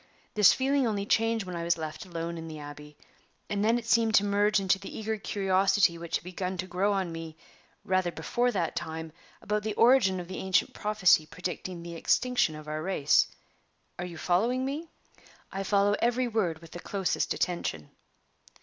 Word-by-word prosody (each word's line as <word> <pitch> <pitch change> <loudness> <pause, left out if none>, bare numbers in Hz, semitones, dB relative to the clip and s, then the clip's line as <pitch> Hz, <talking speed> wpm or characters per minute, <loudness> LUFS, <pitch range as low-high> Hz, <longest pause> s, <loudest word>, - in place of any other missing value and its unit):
This 210 -2 +7
feeling 270 -1 +1
only 205 -2 -1
changed 225 0 +1
when 180 -1 -6
I 170 - -3
was 170 0 +1
left 155 +2 -6
alone 170 -1 -4
in 165 - -7
the 155 -1 -7
Abbey; 150 0 -10 0.5
and 205 0 0
then 225 +2 +3
it 235 - -5
seemed 230 -2 +3
to 200 - +6
merge 205 +1 +2
into 195 0 +2
the 195 - -8
eager 220 0 -2
curiosity 195 -2 +2
which 170 0 -4
had - - -15
begun 185 +1 -4
to 185 - -3
grow 185 +3 0
on 190 -3 -1
me, 165 -1 -7 0.5
rather 185 -2 +1
before 245 +7 0
that 175 -7 -1
time, 160 0 -5 0.3
about 210 +1 0
the 215 0 -3
origin 230 -6 +5
of 175 - -7
the 185 - -6
ancient 190 -2 +1
prophecy 195 -7 +3
predicting 180 0 -5
the 170 0 -7
extinction 245 0 +1
of 155 0 -10
our 155 0 -3
race. 155 -5 +3 0.7
Are 175 - -2
you 170 -2 -8
following 230 +11 +1
me?" 295 +5 -4 0.6
"I 195 - -3
follow 200 +1 +2
every 245 +1 +2
word 185 -8 -1
with 165 - -13
the 175 - -7
closest 195 0 -1
attention." 125 - -2
190 Hz, 185 wpm, -28 LUFS, 170-210 Hz, 0.7 s, This